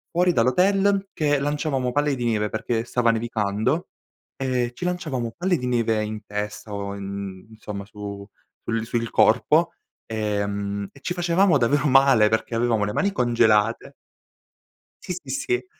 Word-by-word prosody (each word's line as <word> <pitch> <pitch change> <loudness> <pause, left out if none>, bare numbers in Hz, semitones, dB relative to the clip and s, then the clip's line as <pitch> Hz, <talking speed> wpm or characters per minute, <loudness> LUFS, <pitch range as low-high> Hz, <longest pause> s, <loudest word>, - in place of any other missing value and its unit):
fuori 180 +1 +4
dall'hotel 195 +10 +2
che 145 -2 +1
lanciavamo 140 -3 -1
palle 145 +2 +1
di 125 - -4
neve, 105 -2 0
perché 115 +1 -2
stava 120 -1 +1
nevicando, 115 - 0 0.5
e 125 -2 -1
ci 180 - -5
lanciavamo 145 -10 -2
palle 180 +1 +1
di 125 - -5
neve 115 -3 +1
in 105 0 -5
testa, 105 +1 -5
o 100 0 -4
in 100 0 -6
insomma 105 -2 -7
su 100 -1 -8 0.4
sul 115 0 -2
sul 115 0 -2
corpo, - - +3 0.3
ehm, 100 -2 -2
e 140 - -17
ci 175 - -3
facevamo 175 -1 +3
davvero 140 +4 +2
male 135 -5 +5
perché 110 +2 -1
avevamo 115 -2 +1
le 105 - -3
mani 200 0 +1
congelate 115 - +2 1.1
Sì, 180 - -4
sì, 180 - -9
sì. 365 +8 -1
120 Hz, 150 wpm, -24 LUFS, 105-145 Hz, 1.1 s, male